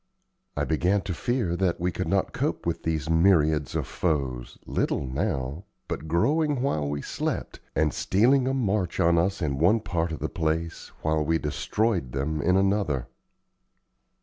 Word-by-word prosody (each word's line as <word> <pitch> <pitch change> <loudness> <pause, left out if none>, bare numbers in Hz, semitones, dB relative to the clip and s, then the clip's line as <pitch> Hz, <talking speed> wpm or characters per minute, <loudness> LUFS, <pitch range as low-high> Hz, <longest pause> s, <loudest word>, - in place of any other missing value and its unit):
I - - +1
began 90 +5 +1
to 95 -2 -4
fear 110 -2 -1
that 90 -2 0
we 90 +1 0
could - - -3
not - - 0
cope - - -2
with - - -1
these 80 -2 -2
myriads 80 -3 +3
of - - 0
foes, 70 -8 -2
little 70 - -1
now, 65 +5 -2 0.2
but 80 - -4
growing 145 - +1
while 75 - 0
we 70 0 -3
slept, - - -3 0.2
and 80 -1 +2
stealing 125 +7 +3
a 135 - +1
march 105 -7 0
on 85 0 +4
us 95 +1 0
in 70 -3 -1
one 95 +8 +4
part 85 -5 -2
of 80 - -3
the - - -2
place 80 +1 -2 0.2
while 80 0 +1
we 80 +2 +2
destroyed 85 - -1
them 75 +3 -1
in 90 +5 +3
another. 95 -10 +1
85 Hz, 165 wpm, -26 LUFS, 75-100 Hz, 0.2 s, on